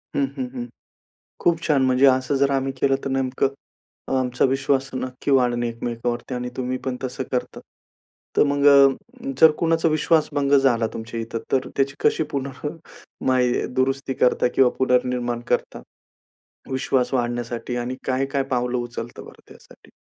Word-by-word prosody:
हं, 140 - +2
हं. 130 - -1
हं. 120 -2 -4 0.8
खूप 170 -2 +2
छान! 150 -5 +2
म्हणजे 130 +1 +4
असं 130 +1 +3
जर 140 +1 +2
आम्ही 135 0 0
केलं 135 -1 +3
तर 135 - -2
नेमकं 135 0 0 0.6
अ, - - -3
आमचा 125 -1 0
विश्वास 135 0 +1
नक्की 130 +2 -4
वाढणे 120 -3 +2
एकमेकांवरती 120 +2 -4
आणि 125 0 -3
तुम्ही 130 0 -2
पण 130 -1 -2
तसं 130 0 -3
करतात. 125 - -2 0.8
तर - - +6
मग, 140 0 0 0.8
जर 160 - +9
कुणाचा 165 0 +2
विश्वास 155 0 +2
भंग 140 -1 +1
झाला 120 -4 +2
तुमच्या 115 +1 -5
इथं. 115 0 -4
तर 130 -1 +1
त्याची 135 0 +1
कशी - - +3
पुन्हा 140 +1 -4 0.6
काय 130 -1 +3 0.3
दुरुस्ती 135 +1 0
करता 125 -1 +2
किंवा 130 -2 +5
पुनर्निर्माण 125 -2 +1
करता - - -1 0.9
विश्वास 130 -1 0
वाढण्यासाठी? 120 0 -2
आणि 120 +1 -3
काय-काय 135 +1 0
पावलं 125 0 0
उचलत 120 -1 -6
बरं - - -13
त्यासाठी? - - -18
130 Hz, 150 wpm, -23 LUFS, 125-135 Hz, 0.9 s, जर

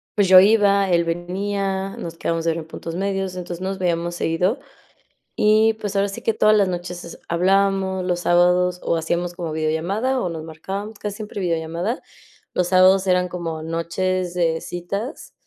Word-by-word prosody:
pues 205 -3 +3
yo 185 0 +9
iba, 200 -1 +4
él 170 -1 +4
venía, 195 +3 -2
nos 165 0 -7
quedábamos 165 0 -1
de 165 - +3
ver 165 - -3
en 160 - -8
puntos 165 0 -7
medios, 195 0 -2
entonces 175 -1 -6
nos 190 +1 -3
veíamos 175 -1 -1
seguido, 180 - 0 0.8
y 215 +1 +4
pues 210 -2 -5
ahora 200 0 +2
sí 195 - -7
que 225 - +1
todas 215 0 +4
las 200 -2 +3
noches 175 0 -5
es 170 - -10
hablábamos, 190 +1 +2
los 175 -1 -1
sábados 180 +1 +3
o 170 - +1
hacíamos 175 +2 -2
como 170 -3 -4
videollamada 175 +12 0
o - - -1
nos 160 -2 -6
marcábamos 195 +7 -6
casi 205 -1 -5
siempre 210 -1 -6
videollamada. 170 +6 -2 0.5
Los 180 -1 0
sábados 185 +1 +5
eran 180 0 +2
como 165 -3 -4
noches 175 +2 -2
de 165 -2 +1
citas, 200 - -5
180 Hz, 175 wpm, -22 LUFS, 170-195 Hz, 0.8 s, yo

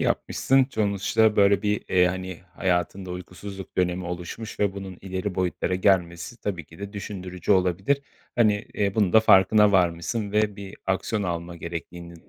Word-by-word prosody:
yapmışsın. 135 0 +2
Sonuçta 110 -1 +1
böyle, 100 0 +4
bir, 105 0 0
eee, 90 -1 +4
hani, 95 -1 -4
hayatında 90 +1 -1
uykusuzluk 90 +2 -8
dönemi 90 0 0
oluşmuş 90 +6 -6
ve 100 -2 +2
bunun 95 -2 -7
ileri 95 0 -4
boyutlara 90 0 -1
gelmesi 90 +2 +1
tabii 90 -6 -3
ki 80 - -16
de 100 +1 -7
düşündürücü 95 -2 -3
olabilir. 95 +9 +1 0.3
Hani, 110 -3 +4 0.2
eee, 100 -1 0
bunun 100 -5 +2
da 110 - +7
farkına 105 0 +5
varmışsın 95 +4 +1
ve 105 -1 +1
bir 100 -1 -9
aksiyon 100 +2 -1
alma 85 -1 -4
gerektiğini. 85 +1 -7
95 Hz, 150 wpm, -25 LUFS, 90-105 Hz, 0.3 s, da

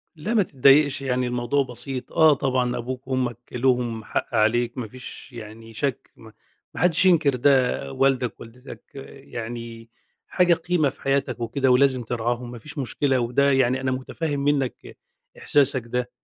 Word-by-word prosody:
لأ 180 +9 -4
ما 215 -4 +4
تتضايقش، 140 0 +4
يعني 125 -2 -1
الموضوع 125 +3 0
بسيط. 125 +1 -5
آه 160 -1 +6
طبعًا، 130 -2 0
أبوك 130 +2 -6
وأمك 125 -3 -1
لهم 120 -3 0
حق 120 - -3
عليك 120 +3 +1
ما 120 -4 -4
فيش 130 +2 -10
يعني 115 0 -10
شَك 135 +3 -3
م 110 - -14 0.4
ما - - -6
حدّش 180 0 +3
ينكر 155 -7 +4
ده، 125 - +2
والدك 130 -3 0
ووالدتك 125 +4 -12 0.4
يعني 115 0 -7 0.4
حاجة 180 -2 +3
قيمة 165 -3 0
في - - -16
حياتك 135 -2 -1
وكده 125 +3 0
ولازم 130 -1 +3
ترعاهم 120 +1 -3
ما 120 - -9
فيش 150 +6 -10
مشكلة 135 0 0
وده 125 +4 +2
يعني 130 0 +2
أنا 130 - -1
مُتفهِّم 145 +3 -3
منّك 140 -2 -2 0.4
إحساسك 140 -3 +2
ده. 125 +1 -3
130 Hz, 155 wpm, -23 LUFS, 120-140 Hz, 0.4 s, آه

